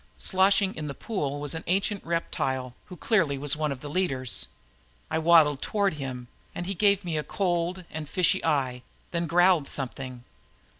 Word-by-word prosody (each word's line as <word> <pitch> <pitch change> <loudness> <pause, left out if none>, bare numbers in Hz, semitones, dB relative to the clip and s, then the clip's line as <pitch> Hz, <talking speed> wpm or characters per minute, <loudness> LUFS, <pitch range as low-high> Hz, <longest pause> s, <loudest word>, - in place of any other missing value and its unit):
Sloshing 195 0 +3
in 150 -1 -5
the 140 - -5
pool 145 - -3
was 145 -1 -2
an 160 - -5
ancient 195 +2 0
reptile 130 -6 -2
who 180 - -11
clearly 165 -9 +1
was 145 +1 +2
one 150 -1 -1
of 135 -2 -6
the 150 - -7
leaders. 135 - 0 0.6
I - - +1
waddled 160 -4 +5
toward 200 -4 0
him 130 -4 -6 0.3
and 175 - -4
he 195 - -2
gave 200 0 +2
me 160 -3 -1
a - - -3
cold 175 0 -1
and 155 -2 -6
fishy 180 -3 +2
eye, 135 -5 0 0.3
then 170 -1 -1
growled 175 -2 +4
something. 130 -2 -1
160 Hz, 170 wpm, -27 LUFS, 140-185 Hz, 0.6 s, waddled